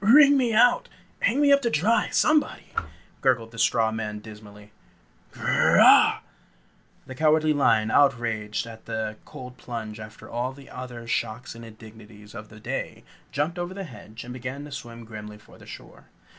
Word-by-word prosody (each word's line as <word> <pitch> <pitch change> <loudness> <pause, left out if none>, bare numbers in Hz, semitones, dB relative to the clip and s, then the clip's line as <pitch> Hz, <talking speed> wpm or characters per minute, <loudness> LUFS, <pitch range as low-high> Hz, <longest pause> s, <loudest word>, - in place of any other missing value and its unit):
"Wring 280 +6 +7
me 250 -4 +2
out! 235 +3 +4 0.3
Hang 250 +5 +1
me 285 -1 +5
up 280 - +4
to 235 - 0
dry, 215 +6 +2
somebody!" 305 -1 +1 0.5
gurgled 115 -4 +1
the 115 - -10
straw 115 -1 +2
man 110 -1 -4
dismally. 105 -1 -13 0.6
"Grrr - - +2
rah!" - - +7 0.8
The 130 - -8
Cowardly 155 +2 +3
Lion, 110 -6 +2
outraged 115 -6 +1
at 115 -1 -12
the 110 -1 -4
cold 125 0 -10
plunge 115 -3 -7
after 110 +1 -11
all 125 +3 -3
the 135 0 -15
other 125 -2 -8
shocks 115 0 -3
and 115 +1 -11
indignities 110 -1 -14
of 105 -2 -9
the 110 - -14
day, - - -5 0.3
jumped 155 +5 -2
over 175 +2 -4
the 195 - -5
hedge 115 - -11
and 125 +1 -8
began 130 +3 -6
to 150 - -11
swim 115 -3 -8
grimly 105 -1 -9
for 105 - -19
the - - -15
shore. - - -12
120 Hz, 170 wpm, -25 LUFS, 110-150 Hz, 0.8 s, Wring